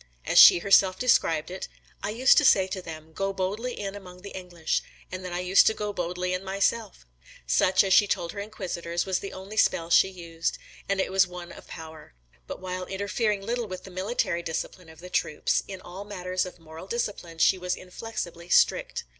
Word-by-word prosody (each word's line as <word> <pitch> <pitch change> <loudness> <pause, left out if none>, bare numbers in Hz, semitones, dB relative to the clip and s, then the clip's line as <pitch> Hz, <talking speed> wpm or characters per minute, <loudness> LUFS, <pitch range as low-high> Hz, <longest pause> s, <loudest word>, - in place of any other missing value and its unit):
As - - +5
she - - +10
herself 190 0 +4
described 165 -9 +2
it 185 - -6 0.3
"I - - -2
used 245 +5 +5
to - - 0
say 190 - +5
to 190 0 -5
them, 160 -2 -10
'Go 195 +3 -1
boldly 205 +6 -3
in 195 -1 -4
among 180 -2 -11
the 200 - -8
English,' 175 -3 -2 0.3
and 185 0 -6
then 180 - -6
I 175 +1 -2
used 180 +2 +5
to 220 - +3
go 210 -1 -3
boldly 180 0 -2
in 185 +1 -3
myself." 200 - -1 0.4
[Ibid.] - - -6
Such, 185 - +4
as 190 -1 +2
she 205 - +6
told 170 -3 -1
her 200 - -7
inquisitors, 175 -5 -4
was 190 -1 0
the 195 - -7
only 195 +3 -9
spell 165 -5 +2
she 190 - +6
used; 170 -3 -4 0.3
and 200 -1 +1
it 190 - 0
was 190 -1 +4
one 180 -1 -9
of - - -13
power. 160 - -11 0.3
But - - -6
while 185 0 -5
interfering 200 +1 -1
little 235 0 -2
with 185 -2 -7
the 190 - -11
military 185 -2 -1
discipline 165 +1 -5
of 160 +1 -15
the 180 - -9
troops, 150 - 0
in 190 -2 -8
all 185 +3 -9
matters 185 -2 -3
of 180 - -11
moral 165 +2 -11
discipline 200 -7 -4
she 185 +3 +4
was 180 0 -2
inflexibly 180 -3 -7
strict. - - +3
185 Hz, 205 wpm, -26 LUFS, 175-200 Hz, 0.4 s, she